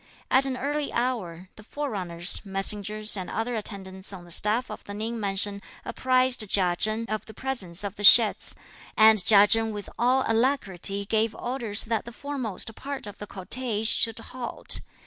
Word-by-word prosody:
At 265 +1 +4
an 260 -1 -3
early 290 +2 -3
hour, 190 -8 -3
the 210 - -13
forerunners, 195 -11 -3
messengers 210 +2 +1
and 185 -3 -4
other 230 +2 -3
attendants 190 -3 -5
on 180 -3 -10
the 175 - -13
staff 215 +8 +1
of - - -9
the 200 - -8
Ning 225 +2 -4
mansion 200 0 0 0.2
apprised 255 0 +1
Chia 180 -3 +2
Chen 215 +4 -1
(of 215 -1 -4
the 220 - -12
presence 205 -10 -1
of 200 -1 -6
the 205 - -7
sheds), 215 +1 +6 0.4
and 220 -2 +6
Chia 205 0 +7
Chen 225 +1 +2
with 205 -2 -8
all 255 +2 +2
alacrity 210 -5 -1
gave 220 +1 0
orders 235 -5 -2
that 225 -1 -2
the 235 - -9
foremost 240 -5 -4
part 280 -3 -7
of 205 - -11
the 205 - -8
cortege 215 +3 -3
should 225 -1 +2
halt. 240 +1 -2
215 Hz, 170 wpm, -25 LUFS, 200-245 Hz, 0.4 s, Chia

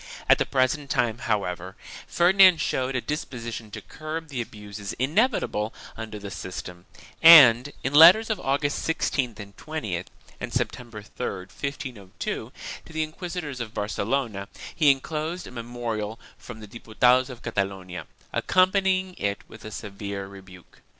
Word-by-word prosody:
At - - +6
the - - 0
present 135 +2 0
time, 120 -2 0
however, 95 -3 -2 0.3
Ferdinand 185 0 +6
showed 130 -3 -1
a 125 - 0
disposition 115 -7 -5
to - - -8
curb 160 +1 -7
the 130 -4 -3
abuses 105 -2 -7
inevitable 140 - 0 0.2
under 110 -1 -7
the 100 -1 -8
system 90 0 -7 0.3
and, 145 -5 +9
in 135 - -2
letters 180 +9 +8
of 210 - -1
August 145 +1 -1
16th 130 -7 -1
and 100 -1 -10
20th 105 - -4 0.3
and - - -5
September 115 -4 -3
3, 115 - -9
1502, 100 +1 -6 0.3
to - - -15
the 160 0 -1
inquisitors 155 -3 -6
of 110 -2 -7
Barcelona, 105 0 -2 0.3
he 150 -3 +4
enclosed 155 +5 -1
a - - -10
memorial 115 -3 -4 0.2
from 110 -3 -11
the 105 - -9
Diputados 125 +4 +2
of 125 -2 -10
Catalonia, 95 -4 -3 0.3
accom 185 0 +3
panying 190 -1 +1
it 100 0 -2
with 110 - -13
a 110 - -7
severe 100 -2 -6
rebuke. 95 -2 -14
120 Hz, 145 wpm, -25 LUFS, 105-150 Hz, 0.3 s, and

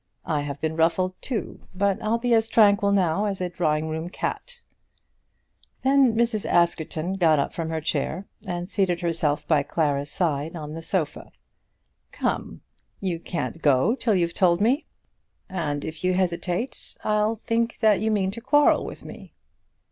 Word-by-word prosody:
I 150 -3 0
have 145 -1 -5
been 160 0 -2
ruffled 170 +3 +2
too, 245 -5 -4 0.2
but 200 0 +1
I'll 220 +2 +1
be 240 0 +1
as 225 0 +3
tranquil 205 -2 +4
now 190 0 +2
as 200 -2 -2
a 180 -1 -2
drawing 155 -3 0
room 160 +2 -4
cat." - - -4 1.2
Then 265 -3 +4
Mrs. 230 -2 +1
Askerton 170 +1 +1
got 160 -4 +4
up 140 - -1
from 165 -1 -3
her 160 -1 -2
chair, 155 +5 -2 0.2
and 175 -1 -3
seated 185 -3 0
herself 165 -4 0
by 155 -3 +4
Clara's 145 -1 -1
side 155 -1 -1
on 150 -2 -6
the 165 - -6
sofa. 165 -2 -3 0.8
"Come; - - -3 0.4
you 180 -4 -2
can't 165 -1 -4
go 140 - +4
till 230 -5 +1
you've 170 -2 +1
told 175 -1 +3
me; 245 +9 +2 0.6
and 150 -6 -3
if 160 +1 -7
you 185 0 +2
hesitate, 180 +5 -2
I - - 0
shall 215 +2 +1
think 230 +1 -1
that 215 -3 +4
you 220 - +1
mean 195 -3 +1
to 230 - -8
quarrel 290 +4 +4
with - - -8
me." - - -11
180 Hz, 165 wpm, -25 LUFS, 160-215 Hz, 1.2 s, tranquil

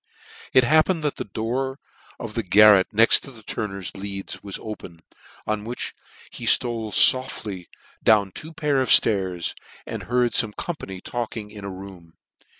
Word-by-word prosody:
It 130 - +5
happened 155 +5 +3
that 150 - -1
the - - -3
door 125 +6 -3 0.4
of 115 -2 -6
the 115 - -1
garret 105 0 +6
next 115 +2 +5
the 120 -5 -12
turner's 100 -3 -5
leads 100 0 -6
was 100 -2 -5
open, 85 -6 -9 0.4
on 110 -1 -2
which 120 +3 -4 0.4
he - - -8
ftole 115 -2 +2
foftiy 105 -6 +3 0.3
down 105 -3 +3
two 155 - -8
pair 150 -4 0
of 130 - -2
llairs, 95 -5 +3 0.3
and - - -6
heard 125 -1 +1
fome 110 -2 +1
company 95 - -6
talking 115 -3 -5
in 105 -1 -10
a 100 - -5
room. 95 -3 -11
110 Hz, 155 wpm, -23 LUFS, 100-125 Hz, 0.4 s, garret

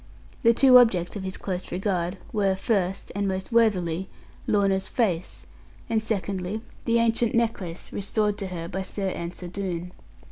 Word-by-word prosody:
The 230 -3 +5
two 255 -1 +8
objects 190 -8 +2
of 205 - -4
his 190 -1 -4
close 185 -2 -4
regard, 180 -1 -1 0.2
were 200 -3 +2
first, 195 -2 -1
and 200 0 -1
most 190 +2 -3
worthily, 190 -6 +2 0.4
Lorna's 195 -2 +2
face, 185 -8 -1 0.5
and 220 -1 +2
secondly, 200 -1 -2 0.2
the 230 -1 +3
ancient 230 0 +2
necklace 210 -7 -2
restored 210 +1 0
to 195 - -3
her 170 -2 -5
by 190 +3 -3
Sir 195 +1 -3
Ensor 175 0 -5
Doone. 180 -2 -4
195 Hz, 150 wpm, -26 LUFS, 180-220 Hz, 0.5 s, two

